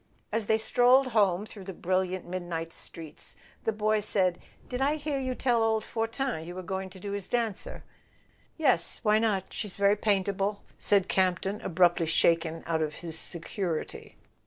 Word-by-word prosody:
As 220 -1 -1
they 220 - +4
strolled 250 +4 +4
home 205 -4 +2
through 205 -3 -10
the 190 - -6
brilliant 185 +1 -1
mid¬ 185 +1 -3
night 165 -1 -5
streets, 160 -2 -10 0.3
the 225 - +2
boy 215 0 +1
said: 185 -4 +1 0.3
"Did 250 +1 -4
I 285 +3 +3
hear 300 -2 -2
you 255 -1 -2
tell 245 -3 +2
old 220 -1 +2
Fortin 225 - -2
you 175 +2 -8
were 185 - -5
going 190 +1 -4
to 190 +1 -12
do 200 +2 -5
his 200 -2 -4
dancer?" 230 -5 -2 0.7
"Yes—why 245 -7 +2
not? 205 -4 0
She's 210 -4 -4
very 200 0 +4
paintable," 200 0 0 0.2
said 200 -2 +3
Camp 185 -2 +2
ton, 200 +2 -3
abruptly 175 -1 +3
shaken 165 0 +2
out 160 -1 0
of 150 -1 -2
his 165 -2 -2
security. 170 -1 -3
200 Hz, 170 wpm, -29 LUFS, 180-225 Hz, 0.7 s, they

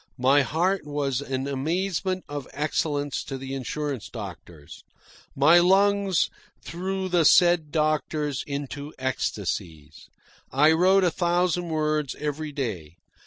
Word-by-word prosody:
My 135 +3 +4
heart 175 +8 0
was 145 -3 -2
an 135 -1 -3
amazement 180 +6 -2
of 145 -2 -6
excellence 145 -1 -1
to 135 - -5
the 135 0 -7
insurance 135 -1 -4
doctors. 90 -8 -10 0.5
My 155 +6 +6
lungs 195 0 +3 0.3
threw 190 +3 -3
the 175 -2 +2
said 175 -1 +5
doctors 150 -2 -1
into 145 +1 -5
ecstasies. 80 - -4 0.4
I 150 +4 +5
wrote 185 +4 +4
a 175 - +3
thousand 175 0 0
words 155 -3 -1
every 150 +1 -4
day. 100 - -5
150 Hz, 120 wpm, -25 LUFS, 135-175 Hz, 0.5 s, My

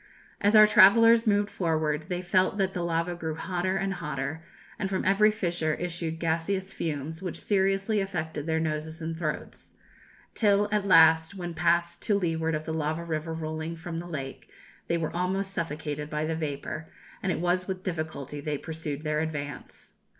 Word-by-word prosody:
As 205 +1 +4
our 215 0 +10
travellers 225 +3 +7
moved 205 0 +2
forward, 155 -3 0
they 180 0 -3
felt 185 +2 +2
that 190 -1 0
the 180 - -2
lava 170 0 0
grew 160 -2 -4
hotter 185 +3 -1
and 195 0 -1
hotter, 150 -2 -4 0.4
and 190 - -1
from 190 -1 -1
every 200 +3 +5
fissure 170 -7 -1
issued 170 -2 -3
gaseous 170 +4 -1
fumes, 160 +1 -4
which 185 -2 -4
seriously 195 +1 +1
affected 160 -5 -4
their 160 0 +1
noses 160 0 -3
and 165 0 -4
throats; 155 -2 -5 0.6
till, 205 -1 +3
at 210 -2 +1
last, 160 0 +6
when 175 -2 -5
passed 170 0 +1
to 210 - +1
leeward 165 -4 0
of 155 0 -4
the 160 - -3
lava 160 +1 -1
river 160 -1 -3
rolling 160 0 -4
from 165 0 -5
the 175 - -7
lake, 135 -5 -6 0.4
they 170 - +1
were 165 -1 -3
almost 190 +2 -1
suffocated 150 -3 -3
by 150 0 -1
the 160 +1 -1
vapour, 155 0 -4 0.3
and 185 - 0
it - - -2
was 180 +1 +1
with 185 -1 -4
difficulty 155 -5 -4
they 150 0 -2
pursued 155 -1 -5
their 150 -1 0
advance. 145 -2 -5
165 Hz, 175 wpm, -28 LUFS, 155-190 Hz, 0.6 s, our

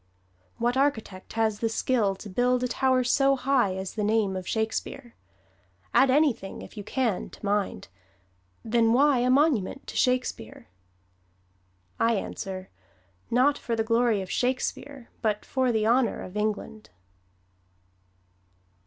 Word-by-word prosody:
What 240 +2 0
architect 220 -9 -1
has 220 -2 0
the 225 - 0
skill 225 -3 0
to 195 - -10
build 245 +5 +1
a - - +1
tower 255 +1 +1
so 275 +2 +3
high 250 -7 +1
as 190 0 -5
the 215 - -2
name 210 -2 +1
of 185 -1 -5
Shakespeare? 220 +1 -3 0.8
Add 270 - +5
anything 265 -8 +1
if - - -13
you 205 - -6
can 230 -2 -1
to - - -11
mind! 200 - -1 0.8
Then 225 0 +3
why 275 +1 +4
a 250 +1 +1
monument 275 - +2
to - - -9
Shakespeare? 250 - -1 1.3
I 230 0 +3
answer, 190 -1 -5 0.6
not 270 +4 +3
for 235 - -2
the 225 - 0
glory 230 -2 +2
of 185 - -9
Shakespeare, 255 +2 -2
but 210 -2 -1
for 260 -2 0
the 220 -2 0
honor 240 +2 +2
of 185 - -10
England! 215 0 -3
230 Hz, 135 wpm, -26 LUFS, 210-255 Hz, 1.3 s, Add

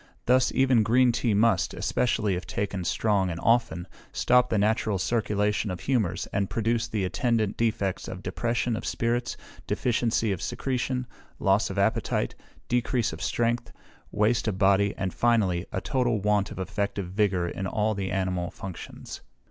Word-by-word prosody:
Thus 130 +1 +4
even 130 -3 +4
green 120 +3 +4
tea 115 -2 0
must, 105 -4 +2
especially 110 -4 0
if 90 +1 -4
taken 100 -2 -2
strong 100 0 +1
and 85 -1 -4
often, 115 -7 +2 0.3
stop 125 0 +3
the 110 - +1
natural 105 0 +1
circulation 105 0 0
of 90 -1 -5
humours, 120 -9 0
and 100 -1 0
produce 115 0 0
the 105 -4 -1
attendant 110 +3 0
defects 105 -5 -1
of - - -7
depression 120 0 -1
of - - -5
spirits, 120 +1 -1 0.3
deficiency 115 -2 +1
of 95 - -3
secretion, 130 -1 -2 0.3
loss 100 +3 +2
of 95 - -5
appetite, 100 +3 +1 0.3
decrease 120 -3 0
of 80 - -8
strength, 120 +7 0 0.4
waste 110 +3 +1
of 100 -4 -1
body, 100 +1 +3
and, 95 -2 -2
finally, 100 -7 +2
a 95 - -2
total 125 -5 0
want 105 0 +1
of - - -9
effective 100 -1 -3
vigour 95 -3 +1
in 95 +2 -4
all 110 +2 0
the 95 -2 -3
animal 90 -2 -1
functions. 95 -3 -8
105 Hz, 155 wpm, -27 LUFS, 95-120 Hz, 0.4 s, Thus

